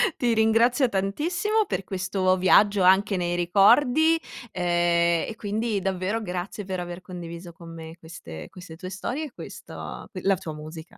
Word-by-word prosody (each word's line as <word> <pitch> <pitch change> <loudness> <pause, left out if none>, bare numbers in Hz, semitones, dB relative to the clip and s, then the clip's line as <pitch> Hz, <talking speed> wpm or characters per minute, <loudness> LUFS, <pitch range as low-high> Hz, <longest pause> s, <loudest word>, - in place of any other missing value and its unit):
ti 240 -2 +1
ringrazio 230 +4 +3
tantissimo 345 - 0
per - - -2
questo 185 0 0
viaggio 200 +2 +4
anche 190 +2 +4
nei 175 0 -1
ricordi, 245 - +4 0.3
ehm, 175 -1 +2
e 220 - -6
quindi 215 0 -2
davvero 190 +4 -1
grazie 185 +1 -5
per 185 -1 -4
aver 175 +1 -6
condiviso 175 -1 -8
con 165 0 -12
me 160 0 -9
queste 85 - -10
queste 180 -3 -12
tue 185 +1 -7
storie, 250 - -4
e 275 - -11
questo - - -10
ehm, - - -8 0.2
la 195 -1 +3
tua 160 -2 -7
musica, 155 +2 -10
185 Hz, 160 wpm, -25 LUFS, 175-220 Hz, 0.3 s, viaggio